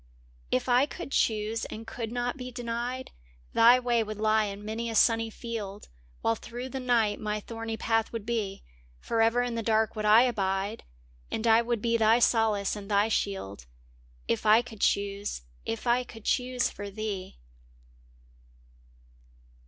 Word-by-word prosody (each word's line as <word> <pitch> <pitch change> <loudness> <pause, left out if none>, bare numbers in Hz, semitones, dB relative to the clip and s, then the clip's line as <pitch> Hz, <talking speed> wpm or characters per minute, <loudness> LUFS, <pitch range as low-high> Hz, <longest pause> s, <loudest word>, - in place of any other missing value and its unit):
w - - +4
If - - -6
I 250 +3 +4
could 345 -2 -8
choose 220 -1 0
and 225 +1 -8
could 225 -1 -5
not 245 0 -2
be 255 -2 -7
denied, 245 +2 -4 0.4
Thy 240 +2 +7
way 240 -2 +1
would 215 -1 -4
lie 215 0 +3
in 200 0 -6
many 225 +2 -3
a 225 - -4
sunny 225 +1 +4
field 215 -3 -6 0.3
While 115 - +2
through 245 - -7
the 265 - -4
night 235 -5 +1
my 210 0 -2
thorny 225 +1 -5
path 225 -1 0
would 230 -3 -5
be; 210 -4 -2 0.4
Forever 230 - +2
in 245 -1 -2
the 230 - -2
dark 220 0 +1
would 215 -1 -3
I 215 +3 +7
abide 200 -3 -1 0.5
And 220 - -3
I 225 0 +6
would 235 -2 -2
be 230 -1 +2
thy 225 +1 +5
solace 220 -4 +2
and 205 -1 -8
thy 205 +1 +3
shield, 100 - -2 0.6
If - - 0
I 220 +2 +6
could 225 -4 -11
choose 200 - 0
— - - -31
if 115 - -4
I 245 +1 +3
could 225 -3 -13
choose 250 -1 +1
for 205 0 -7
thee! 200 - -5
225 Hz, 170 wpm, -28 LUFS, 210-235 Hz, 0.6 s, Thy